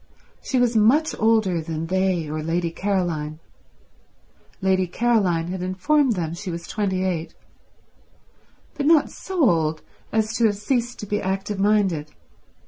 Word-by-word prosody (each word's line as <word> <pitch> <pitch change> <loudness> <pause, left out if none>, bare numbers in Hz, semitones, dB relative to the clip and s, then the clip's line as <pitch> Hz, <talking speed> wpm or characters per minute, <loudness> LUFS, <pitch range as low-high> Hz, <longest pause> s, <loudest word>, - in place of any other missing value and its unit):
She 265 - -2
was 245 -1 +2
much 255 +9 +4
older 215 -6 +2
than 160 0 -4
they 185 -2 0
or 155 +1 -3
Lady 165 +2 -1
Caroline—Lady 180 +1 -4
Caroline 185 -6 +1
had 185 0 -4
informed 240 +9 +2
them 165 -4 -3
she 185 +3 -6
was 170 0 -5
twenty 190 -3 -1
eight—but 170 -3 -3 1.5
not 320 -2 +4
so 360 -8 0
old 160 -4 +1 0.3
as 220 0 0
to 235 - +3
have 205 - 0
ceased 240 +2 -1
to - - -5
be 205 +1 -2
active 195 +1 -2
minded. 195 -7 +1
190 Hz, 135 wpm, -23 LUFS, 170-220 Hz, 1.5 s, much